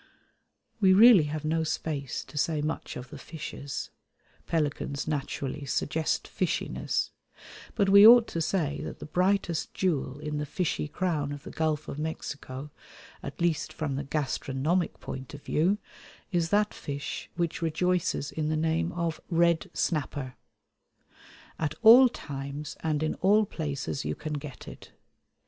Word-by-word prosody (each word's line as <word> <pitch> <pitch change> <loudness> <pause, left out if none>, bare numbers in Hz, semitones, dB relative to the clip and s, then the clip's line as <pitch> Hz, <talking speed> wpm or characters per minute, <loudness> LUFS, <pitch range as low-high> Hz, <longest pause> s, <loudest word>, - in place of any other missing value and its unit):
We 190 -3 +6
really 215 -6 +8
have 155 +1 -4
no 160 +1 +1
space 150 -4 -3
to - - -15
say 150 +1 0
much 155 +1 -3
of 125 0 -9
the - - -8
fishes 145 -3 -6 0.6
(pelicans 145 -2 -1
naturally 145 -1 -3
suggest 155 +3 -1
fishiness); - - -1 0.6
but 200 -3 +2
we 200 +2 +9
ought 235 0 +9
to 165 - -2
say 155 -3 -1
that - - -6
the - - -8
brightest 180 +1 0
jewel 145 -7 0
in 150 0 -4
the 150 - -2
fishy 165 -1 -1
crown 150 -3 -1
of 145 -1 -7
the - - -8
Gulf 155 -1 -1
of 145 - -5
Mexico, 150 -3 -5 0.5
at - - -8
least 170 -3 0
from 150 -4 -3
the 140 - -2
gastronomic 150 +3 -1
point 130 +1 -7
of 145 - -12
view, 180 +7 +2 0.5
is 170 -3 +1
that 210 +2 +2
fish 140 -1 -5
which 170 -1 -2
rejoices 170 -2 0
in 155 -1 -2
the 155 - 0
name 165 +2 0
of 170 -2 -2
Red 170 -1 +2
Snapper. 145 -4 -2 1.3
At 155 -1 -1
all 245 +3 +9
times 140 - -6
and 155 -1 -1
in 155 - 0
all 210 +3 +5
places 145 -5 -4
you - - -2
can 150 0 -5
get 145 -2 -7
it. - - -11
155 Hz, 150 wpm, -28 LUFS, 145-170 Hz, 1.3 s, we